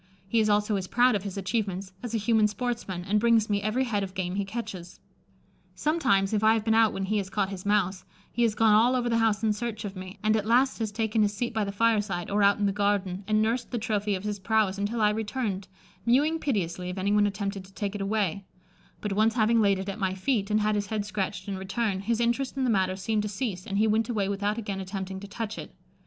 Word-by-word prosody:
He 230 +4 +2
is 215 -1 +2
also 210 0 +2
as 185 -1 -4
proud 245 +4 +4
of 205 - 0
his 200 0 -6
achievements 195 -2 -2
as 240 -2 -4
a - - +3
human 220 0 +3
sportsman, 210 -5 -4
and 210 +2 +2
brings 225 -1 +3
me 200 0 +1
every 215 +5 0
head 220 -5 -1
of 190 -1 -5
game 180 -1 -2
he 200 +1 -1
catches. 195 -4 -7 0.8
Sometimes, 255 -11 +1
if 215 0 +1
I 220 +1 +6
have 220 -1 -2
been 220 - +3
out 225 -1 +5
when 195 - -3
he 215 +2 0
has 190 -1 -4
caught 195 -1 0
his 195 0 -6
mouse, 195 -2 +1 0.3
he 240 - -2
has 225 -3 +3
gone 220 0 +4
all 235 +4 +5
over 245 -1 0
the 230 -1 +2
house 225 -1 +1
in 215 -1 +3
search 215 0 -4
of 200 -1 -6
me, 185 +2 -8
and 215 0 +3
at 215 -1 -1
last 250 +3 +3
has 220 -2 -2
taken 220 0 0
his 205 0 +1
seat 240 +3 -2
by 220 -2 0
the 200 - -3
fireside, 205 -5 0
or 205 +1 +2
out 200 0 +5
in 205 - 0
the 200 - +2
garden, 200 -2 0
and 215 0 +3
nursed 230 +2 -1
the 245 - -2
trophy 210 -2 -1
of 185 - -6
his 210 -1 -3
prowess 200 -1 +1
until 215 +3 -1
I 210 0 +4
returned, 210 -3 -3 0.4
mewing 290 +8 +3
piteously 180 - -2
if 180 - -5
anyone 205 +2 +3
attempted 200 -1 -3
to 190 - -17
take 205 -2 -3
it 205 - -4
away; 200 -2 -1 0.6
but 210 -2 -2
once 220 +3 +2
having 230 0 +3
laid 200 -2 +3
it 190 +1 -5
at 200 +2 -4
my 190 -2 0
feet, 200 0 0
and 215 0 +2
had 215 0 +2
his 205 -1 -1
head 215 -2 -2
scratched 200 -2 -3
in 195 -2 -3
return, 195 +1 -1
his 225 +4 -1
interest 240 +3 0
in 265 - 0
the 250 - +2
matter 190 -2 +1
seemed 210 +3 -1
to 210 - -3
cease, 200 -4 -4
and 200 - -2
he 215 - +4
went 220 +2 +1
away 210 -5 0
without 200 +2 -1
again 205 -4 -4
attempting 190 0 -5
to 200 - -9
touch 220 +1 -5
it. - - -9
210 Hz, 255 wpm, -27 LUFS, 195-225 Hz, 0.8 s, I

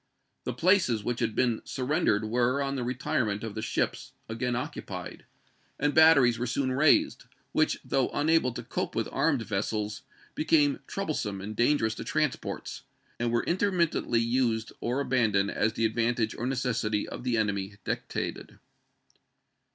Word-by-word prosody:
The - - -2
places 170 - +3
which 120 +2 -2
had 110 -2 -1
been 120 -3 +1
surrendered 125 -5 0
were, 120 +4 +1
on 140 -1 -1
the 130 - -2
retirement 120 -4 -1
of 110 -2 -5
the 110 - -4
ships, - - -2
again 120 +2 -2
occupied, 110 - -6 0.5
and 145 +1 +1
batteries 140 -7 +6
were 125 - -1
soon 130 +2 0
raised, 140 +4 +3 0.3
which, - - +1
though 135 -2 +1
unable 155 -3 +2
to - - -6
cope - - -3
with - - 0
armed 140 -7 +1
vessels, 105 +1 -2 0.3
became 150 -2 +2
troublesome 150 - -3
and 105 +3 -6
dangerous 120 -2 +2
to - - -7
transports, - - -2 0.4
and 120 0 0
were 120 - +1
intermittently 170 - +1
used 115 -1 0
or 125 +4 -1
abandoned 110 -7 +2
as 110 0 +1
the 115 - 0
advantage 115 0 0
or 120 - -3
necessity 115 -5 -1
of - - -7
the 125 -2 0
enemy 100 -2 -1
dictated. - - -4
120 Hz, 150 wpm, -28 LUFS, 110-135 Hz, 0.5 s, batteries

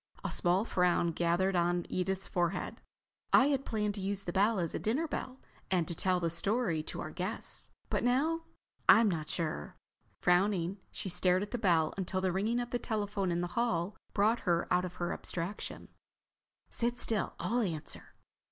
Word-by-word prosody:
A - - -2
small 180 +4 +2
frown 180 -4 +2
gathered 175 +3 +1
on 175 0 +1
Edith's 190 +1 0
forehead. 175 0 -1 0.5
"I 270 - +6
had 275 -2 0
planned 210 -2 0
to 200 - -6
use 195 +1 -2
the 175 - -4
bell 205 +3 +3
as 170 -3 -1
a - - -2
dinner 270 +10 0
bell 260 -3 -4 0.3
and 175 -4 +1
to - - -1
tell 185 +2 +2
the 170 -1 0
story 195 -2 +1
to - - -6
our 155 - -5
guests. 185 +6 -5 0.2
But - - 0
now—I'm 270 -3 +2
not 155 -3 -3
sure." 155 - -3 0.4
Frowning, 180 +1 +2
she - - -5
stared 185 +1 +2
at 205 - -7
the 245 - -2
bell 165 -7 +3
until 185 0 -1
the 185 -1 +1
ringing 215 +6 0
of 245 0 -4
the 245 - 0
telephone 205 -4 -1
in 170 0 0
the 175 - -2
hall 205 -5 0 0.2
brought 215 +3 +3
her 175 -4 +1
out 180 +1 +3
of 180 -1 -7
her 175 -1 -2
abstraction. 180 +4 -4 0.8
"Sit 240 +1 -1
still, 220 -4 0
I'll 240 +2 +1
answer." 165 -8 -4
190 Hz, 180 wpm, -32 LUFS, 175-220 Hz, 0.8 s, I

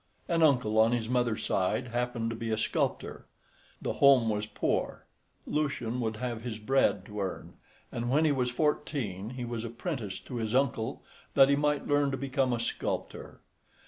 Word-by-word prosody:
An 165 -1 +1
uncle 125 -8 +4
on 115 +2 +5
his 115 -2 -1
mother's 120 -3 0
side 100 +6 0
happened 120 -1 -1
to - - -4
be 115 0 -4
a 110 - 0
sculptor. 110 - -2 0.5
The - - -2
home 135 -5 +6
was 105 0 -1
poor, - - -2 0.4
Lucian 125 -5 -1
would 110 -2 -1
have 120 0 -4
his 115 -2 -5
bread 110 -4 +2
to 105 0 -5
earn, 95 -2 -5 0.4
and 120 0 -3
when 150 +5 +3
he 155 - +4
was 125 -3 +1
fourteen 125 - -1
he 125 0 -5
was 120 -1 -4
apprenticed 115 - -5
to 125 - -5
his 110 0 -2
uncle 125 -4 0 0.3
that 135 0 +7
he 140 - +5
might 145 0 +1
learn 145 -1 +3
to 135 - -2
become 135 0 0
a 120 - 0
sculptor. 115 - -4
120 Hz, 175 wpm, -30 LUFS, 110-135 Hz, 0.5 s, that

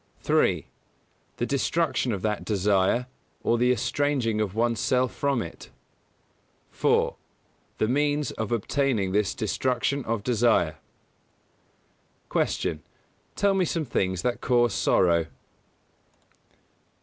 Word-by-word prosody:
3. - - +2 0.7
The 120 - -1
destruction 140 0 0
of 100 -4 -3
that 105 -1 -1
desire, 100 +3 +1 0.4
or 115 - +2
the 125 +1 +3
estranging 120 -2 0
of 100 -2 -2
one's 115 0 +1
self 130 -1 +1
from 140 -5 0
it. - - -10 1.0
4. - - +1 0.6
The 110 - +1
means 145 +3 +1
of 110 -1 -4
obtaining 115 -3 0
this 105 0 +1
destruction 125 +4 -1
of 110 -2 -2
desire. 110 -10 +2 1.5
122. - - 0
Q. - - -23 0.5
_Tell 200 -1 +2
me 190 - +2
some 165 -2 -1
things 95 -7 -1
that 125 -1 -1
cause 120 -3 +2
sorrow? 85 -3 +2
120 Hz, 115 wpm, -26 LUFS, 105-135 Hz, 1.5 s, the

